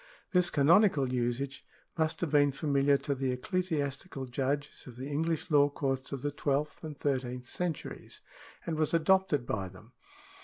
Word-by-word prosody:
This 180 -2 +3
canonical 150 -3 +4
usage 125 +3 -2 0.3
must 160 0 0
have 170 -5 -1
been 145 -1 +5
familiar 140 -1 +2
to 140 - -2
the 135 -1 -1
ecclesiastical 145 -1 -2
judges 140 +4 -3
of 125 - -10
the 130 +3 -6
English 160 +3 -1
law 145 -1 +5
courts 135 -2 -2
of 140 -3 -5
the 145 - 0
twelfth 145 +2 -1
and 155 -2 -6
thirteenth 125 -3 -2
centuries, 170 +4 -5 0.4
and 160 -2 -2
was 155 +1 +2
adopted 165 -5 +3
by 100 -5 -2
them. 105 +6 -15
145 Hz, 155 wpm, -31 LUFS, 130-160 Hz, 0.4 s, been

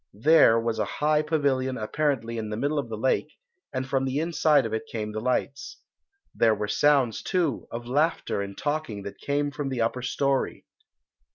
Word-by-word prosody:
There 115 -1 +5
was 115 -1 -2
a - - +2
high 150 0 +3
pavilion 140 -4 0
apparently 115 -1 -1
in 110 -1 -4
the 105 - -4
middle 145 +5 0
of 120 - -4
the 110 - -4
lake, 130 +5 0 0.3
and 130 0 -3
from 135 0 0
the 135 +1 -1
inside 160 -3 +3
of 110 - -4
it 110 0 -3
came 105 -2 -3
the 110 - -4
lights. 130 +3 -2 0.6
There 110 -1 +3
were 105 0 -3
sounds, 135 +1 +2
too, 170 -9 -1
of 120 +1 -6
laughter 145 -4 0
and 100 0 -6
talking 145 -9 -3
that 100 - -8
came 145 0 -1
from 140 0 -4
the 130 -3 -2
upper 115 +2 0
storey. 135 +2 -1
130 Hz, 185 wpm, -26 LUFS, 115-145 Hz, 0.6 s, There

